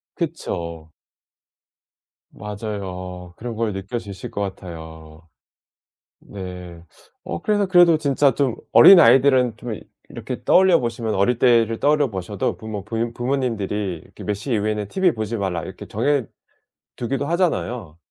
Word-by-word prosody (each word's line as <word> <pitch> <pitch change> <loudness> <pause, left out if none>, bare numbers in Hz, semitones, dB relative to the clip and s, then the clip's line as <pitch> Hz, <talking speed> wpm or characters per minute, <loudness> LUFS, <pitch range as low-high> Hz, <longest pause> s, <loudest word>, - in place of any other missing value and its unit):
그쵸. 85 - -5 1.4
맞아요. 95 -4 -7
그런 115 -1 -6
걸 110 -2 -1
느껴지실 100 0 -6
것 100 - -4
같아요. 80 -4 -8 0.9
네. 90 -3 -9 0.4
어 85 - -5
그래서 205 -1 +1
그래도 175 -3 +5
진짜 140 -2 +2
좀 135 -5 0 0.2
어린 190 -2 +9
아이들은 125 -3 +5
좀 120 -1 -5 0.4
이렇게 - - -7
떠올려 185 -2 +5
보시면 115 -2 -2
어릴 115 +5 +1
때를 115 -2 +3
떠올려 145 -2 +2
보셔도 95 0 -3
부모 110 -3 -6
부인 115 +2 -3
부모님들이 105 - -2
이렇게 - - -13
"몇 105 - -1
시 120 +5 -4
이후에는 105 -1 -1
티브이 185 - +1
보지 110 +1 -3
마라." 95 -4 -2
이렇게 - - -9
정해 145 -5 0 0.7
두기도 135 +3 -2
하잖아요. 125 - -1
110 Hz, 300 characters per minute, -22 LUFS, 95-130 Hz, 1.4 s, 어린